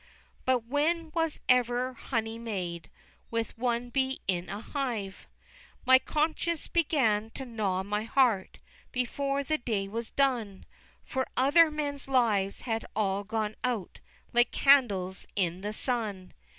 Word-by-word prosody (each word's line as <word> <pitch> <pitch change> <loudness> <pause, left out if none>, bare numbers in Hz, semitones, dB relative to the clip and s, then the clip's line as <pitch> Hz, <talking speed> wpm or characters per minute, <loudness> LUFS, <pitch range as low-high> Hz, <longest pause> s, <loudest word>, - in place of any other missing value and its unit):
But 255 -2 +2
when 310 +5 0
was 325 -2 0
ever 250 0 +3
honey 225 -2 -3
made 180 -7 -4 0.4
With 230 -1 -2
one 240 0 -1
bee 265 0 0
in 180 -1 -1
a 200 - -4
hive! 225 -7 -4
XXX. - - -26
My 260 0 +8
conscience 315 +3 -1
began 255 -10 +2
to 265 - -5
gnaw 205 -6 -1
my 210 +2 -2
heart 230 -6 +2 0.3
Before 275 +3 -1
the 310 +2 0
day 215 -5 -1
was 225 +3 -4
done, 240 -8 0 0.4
For 260 0 -2
other 310 +5 +6
men's 290 -2 -3
lives 220 -7 +2
had 225 -2 -2
all 200 -1 0
gone 215 0 -2
out, 235 -7 -2 0.3
Like 240 0 +4
candles 205 -10 +3
in 180 -2 0
the 205 +1 -3
sun! 215 -5 -2
235 Hz, 140 wpm, -29 LUFS, 205-270 Hz, 0.4 s, My